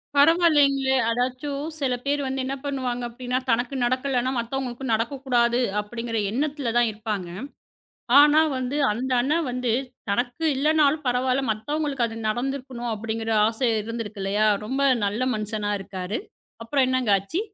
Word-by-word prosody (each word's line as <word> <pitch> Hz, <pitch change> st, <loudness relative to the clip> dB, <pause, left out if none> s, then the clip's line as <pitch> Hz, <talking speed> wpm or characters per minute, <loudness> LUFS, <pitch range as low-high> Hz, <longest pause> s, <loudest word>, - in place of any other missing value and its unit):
பரவால்லீங்களே! 285 Hz, -4 st, +4 dB
அதாச்சும் 255 Hz, +4 st, -2 dB
சில 260 Hz, -3 st, 0 dB
பேர் 285 Hz, +1 st, +1 dB
வந்து 265 Hz, 0 st, -2 dB
என்ன 270 Hz, -, -2 dB
பண்ணுவாங்க 255 Hz, -3 st, -2 dB
அப்பபிடின்னா 250 Hz, +1 st, -3 dB
தனக்கு 240 Hz, +4 st, +1 dB
நடக்கலன்னா 255 Hz, 0 st, 0 dB
மத்தவங்களுக்கு 255 Hz, +1 st, -4 dB
நடக்கக்கூடாது 240 Hz, 0 st, +1 dB, 0.2 s
அப்பபிடிங்கிற 230 Hz, +2 st, -3 dB
எண்ணத்துல 280 Hz, -1 st, -1 dB
தான் 240 Hz, -1 st, +4 dB
இருப்பாங்க. 210 Hz, -4 st, -4 dB, 0.9 s
ஆனா 295 Hz, +2 st, +7 dB, 0.2 s
வந்து 255 Hz, +3 st, -2 dB
அந்த 250 Hz, +5 st, -3 dB
அண்ணா 295 Hz, +6 st, +1 dB
வந்து 250 Hz, -2 st, -1 dB, 0.4 s
தனக்கு 245 Hz, +9 st, -1 dB
இல்லன்னாலும் 300 Hz, +1 st, +2 dB
பரவாயில்ல, 255 Hz, +2 st, +1 dB
மத்தவங்களுக்கு 275 Hz, +3 st, -1 dB
அது 225 Hz, -, -8 dB
நடந்திருக்கணும் 250 Hz, 0 st, -3 dB
அப்பபிடிங்கற 225 Hz, +1 st, -3 dB, 0.2 s
ஆசை 230 Hz, +2 st, 0 dB
இருந்திருக்கு 220 Hz, -2 st, -5 dB
இல்லயா! 205 Hz, +2 st, +2 dB, 0.2 s
ரொம்ப 270 Hz, +5 st, -2 dB, 0.2 s
நல்ல 205 Hz, +5 st, -2 dB
மனுஷனா 210 Hz, -1 st, -3 dB
இருக்காரு. 190 Hz, +1 st, -4 dB, 0.4 s
அப்புறம் 260 Hz, +3 st, +2 dB
என்னங்க 255 Hz, -4 st, +1 dB
ஆச்சு? 200 Hz, -, -3 dB
250 Hz, 130 wpm, -24 LUFS, 225-275 Hz, 0.9 s, ஆனா